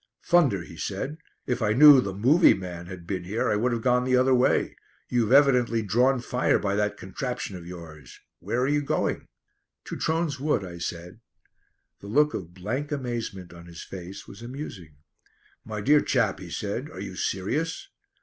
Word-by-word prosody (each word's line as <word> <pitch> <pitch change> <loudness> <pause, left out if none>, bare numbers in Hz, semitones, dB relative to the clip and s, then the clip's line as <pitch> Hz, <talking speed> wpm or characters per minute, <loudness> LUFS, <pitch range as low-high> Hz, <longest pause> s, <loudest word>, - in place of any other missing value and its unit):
"Thunder," 140 - +3
he 85 -1 -12
said, 120 - -4 0.3
"if 125 -1 -2
I 105 -1 +2
knew 145 +1 +9
the 100 - -3
'movie' 130 - +5
man 90 -2 -7
had 90 -2 -9
been 90 0 -3
here 105 +5 -1
I - - +2
would 120 +4 +1
have 115 -1 -2
gone 125 -1 +3
the 130 0 +2
other 130 +1 +4
way. 125 0 +2 0.3
You've 120 -2 +1
evidently 125 -5 +4
drawn 125 +5 +2
fire 125 +1 +1
by 100 -1 -1
that 105 0 0
contraption 120 0 -5
of 85 -1 -9
yours. 80 -7 -11 0.2
Where 120 - -2
are 130 - +2
you 145 +1 +2
going?" 140 - -1 0.6
"To - - -6
Trones 160 -4 -1
Wood," 140 -8 0
I 85 -1 -9
said. 85 +4 -6 0.8
The 100 - -11
look 150 +7 +3
of 85 -2 -6
blank 125 - -4
amazement 120 -10 -4
on 85 0 -13
his 85 -1 -9
face 95 +1 -9
was 100 - -12
amusing. 120 - -8 0.7
"My 105 -1 -5
dear 145 +6 +5
chap," 115 -7 +1
he 90 - -9
said, 105 - -4
"are 95 - -10
you 95 -1 -6
serious?" 150 - -2
110 Hz, 180 wpm, -26 LUFS, 95-130 Hz, 0.8 s, knew